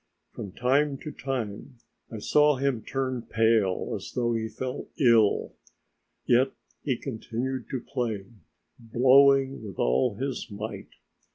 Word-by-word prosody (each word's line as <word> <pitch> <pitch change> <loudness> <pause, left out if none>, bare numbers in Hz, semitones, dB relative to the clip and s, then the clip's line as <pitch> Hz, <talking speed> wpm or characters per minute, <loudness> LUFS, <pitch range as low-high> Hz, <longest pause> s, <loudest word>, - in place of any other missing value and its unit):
From 100 - -7
time 135 +3 +1
to 150 - -5
time 130 -2 -5 0.4
I 115 - -5
saw 150 +7 +3
him 130 -3 0
turn 130 +2 -2
pale 110 -4 +1
as - - -8
though 120 -1 0
he 110 -1 -1
felt 130 +2 -5
ill, 115 -6 +4 0.7
yet 130 +2 +3 0.3
he 130 -5 -1
continued 130 +1 -4
to 130 - -3
play, 115 -8 -3 0.5
blowing 135 +3 +4
with 100 -4 -8
all 100 - +2
his 130 +2 -4
might. 105 +1 -6
125 Hz, 125 wpm, -27 LUFS, 110-135 Hz, 0.7 s, ill